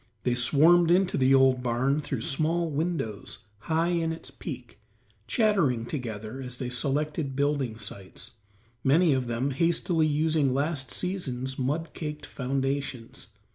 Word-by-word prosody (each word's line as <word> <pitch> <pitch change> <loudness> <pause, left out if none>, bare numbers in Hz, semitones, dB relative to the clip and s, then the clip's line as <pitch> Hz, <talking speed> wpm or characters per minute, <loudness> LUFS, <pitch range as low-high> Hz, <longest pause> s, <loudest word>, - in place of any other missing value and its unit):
They 125 - +1
swarmed 155 +8 +5
into 180 +1 +3
the 135 0 +4
old 130 -1 +4
barn 130 +4 +1
through 135 -5 -4
small 160 +5 0
windows 145 - -3
high 165 +7 0
in 165 -2 0
its 160 - -8
peak, - - -8 0.5
chattering 175 - +2
together 115 -2 -5
as 125 -1 -7
they 125 -1 -4
selected 145 +2 -1
building 140 -5 0
sites, 100 -4 -7 0.5
many 155 +3 +4
of 130 -2 -1
them 120 +4 -1
hastily 165 +2 +1
using 150 -3 +1
last 140 -1 -1
season's 130 -9 -4
mud 150 +5 -2
caked 150 -2 -6
foundations. 135 -2 -3
140 Hz, 135 wpm, -27 LUFS, 125-160 Hz, 0.5 s, swarmed